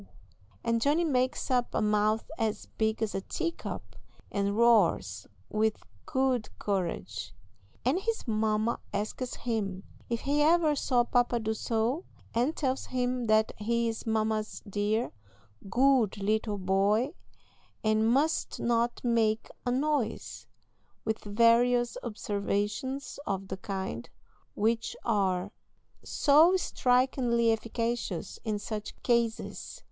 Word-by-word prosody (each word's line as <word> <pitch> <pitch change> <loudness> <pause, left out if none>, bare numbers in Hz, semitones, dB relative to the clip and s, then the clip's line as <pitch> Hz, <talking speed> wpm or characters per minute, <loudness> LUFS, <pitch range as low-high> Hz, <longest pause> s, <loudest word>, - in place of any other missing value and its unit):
and 230 0 +1
Johnny 295 +7 +3
makes 260 -3 0
up 245 -1 +1
a - - +2
mouth 210 +2 +1
as 220 -2 -1
big 220 0 -1
as 215 - -2
a 195 - -2
tea 335 - -2
cup, - - -7 0.4
and 200 0 0
roars 195 - +3 0.2
with 220 0 0 0.2
good 260 -4 +1
courage, 100 - -3 0.5
and 275 +8 +3
his 450 - -2
mamma 215 +1 +1
asks 215 +5 -3
him 200 -5 -2 0.3
"if 235 -1 -1
he 290 +2 +1
ever 315 0 +4
saw 250 -3 +2
pa 245 +1 +3
do 230 -2 -1
so," 230 - -1 0.3
and 250 +7 +1
tells 265 -2 -1
him 250 -1 -1
that 215 0 +4
"he 235 +2 +1
is 225 0 -4
mamma's 220 -1 -1
dear, 210 +3 0 0.6
good 250 -2 +3
little 210 +1 0
boy, 200 - +2 0.7
and 215 +1 +3
must 295 +5 +1
not 235 0 0
make 225 -2 +1 0.2
a - - +2
noise," 270 -3 -1 0.6
with 220 0 -1
various 235 +3 +4
observations 210 +5 -2
of 195 -1 -2
the 190 - -4
kind, 190 - -4 0.5
which 225 +2 0
are 190 -1 +1 0.5
so 315 +6 +5
strikingly 250 -6 +2
efficacious 230 -4 -2
in 215 -2 -1
such 210 0 -5
cases. 235 - -1
225 Hz, 120 wpm, -29 LUFS, 210-250 Hz, 0.7 s, so